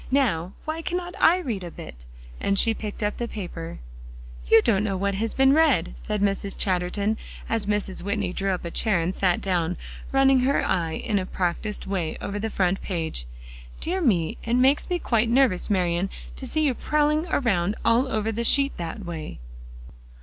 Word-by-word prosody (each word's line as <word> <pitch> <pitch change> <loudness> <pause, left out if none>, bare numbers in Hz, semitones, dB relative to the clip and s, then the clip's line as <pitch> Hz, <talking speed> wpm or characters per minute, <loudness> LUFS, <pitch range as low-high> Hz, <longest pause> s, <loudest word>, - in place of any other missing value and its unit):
Now, 200 -10 +1
why 315 +1 -3
cannot 355 +1 -3
I 345 - +6
read 235 - -3
a 175 - -5
bit?" - - -10 0.3
and 200 - 0
she 225 +3 +4
picked 215 -1 -5
up 210 - -1
the 240 - -2
paper. 175 -6 -6 0.7
"You 225 - +7
don't 210 -4 +2
know 195 -3 -1
what 200 +1 0
has 220 +3 -2
been 270 0 +5
read," 290 - +3
said 210 -1 -3
Mrs. 195 0 -1
Chatterton 195 +3 0 0.3
as 225 -2 -1
Mrs. 205 -2 -1
Whitney 200 -1 -2
drew 195 +1 -1
up 180 -2 -3
a 170 - -4
chair 210 -2 +1
and 170 +3 -1
sat 180 -2 +1
down, 180 -2 0 0.3
running 270 -1 +5
her 265 +3 +2
eye 165 -3 0
in 205 +4 -1
a 185 - -4
practiced 185 +4 -2
way 185 -5 -2
over 205 +1 -4
the 220 +2 -2
front 190 -2 0
page. 160 - -3 0.5
"Dear 370 +3 -1
me, 180 - +1
it 235 +1 0
makes 265 +7 +3
me 360 - +1
quite 230 -8 +1
nervous, 240 -7 +4
Marian, 180 -1 +1 0.3
to - - -6
see 310 - 0
you 280 -4 +3
prowling 300 +5 +1
around 200 - +1
all 245 +3 +3
over 220 0 0
the 230 +2 -2
sheet 275 +4 +3
that 175 +4 -5
way." 160 -3 -6
205 Hz, 185 wpm, -25 LUFS, 180-250 Hz, 0.7 s, You